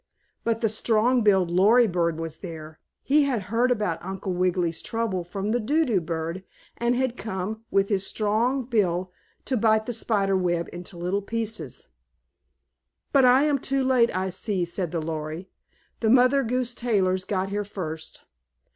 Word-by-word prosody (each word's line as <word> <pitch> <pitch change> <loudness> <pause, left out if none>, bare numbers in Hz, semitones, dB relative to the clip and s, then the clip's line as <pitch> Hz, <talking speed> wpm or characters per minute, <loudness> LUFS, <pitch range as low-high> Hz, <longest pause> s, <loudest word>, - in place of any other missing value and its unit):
But 230 -1 0
the 225 - +3
strong 225 +3 +2
billed 190 -5 +3
Lory 210 +7 +5
bird 170 -5 0
was 165 -1 -5
there. 160 -3 -9 0.2
He 290 +1 +4
had 245 -7 -1
heard 240 +2 +3
about 210 -10 -1
Uncle 190 +1 -4
Wiggily's 180 -2 0
trouble 225 -6 -2
from 195 +4 -3
the 240 - +1
Do 295 +8 +1
do 215 -9 +1
bird, 165 +2 -4 0.3
and 235 +1 +1
had 255 -1 0
come, 220 +2 -5
with 195 0 +2
his 195 -3 +1
strong 230 +5 0
bill, 185 -6 0 0.3
to 260 - 0
bite 220 -1 +3
the 245 - -3
spider 200 -3 +1
web 175 -2 0
into 175 +1 -9
little 180 +4 -1
pieces. 220 - -4 1.3
"But 270 -2 +6
I 255 +3 +6
am 295 -2 +2
too 270 +1 0
late, 255 -3 +4
I 190 0 -1
see," 190 -1 -1
said 175 0 -2
the 165 - -2
Lory. 160 +3 -5 0.5
"The 220 - +1
Mother 255 +3 +5
Goose 250 0 -1
Tailors 190 -7 +1
got 190 0 -2
here 205 +1 -2
first. 160 -6 -6
205 Hz, 165 wpm, -25 LUFS, 180-235 Hz, 1.3 s, But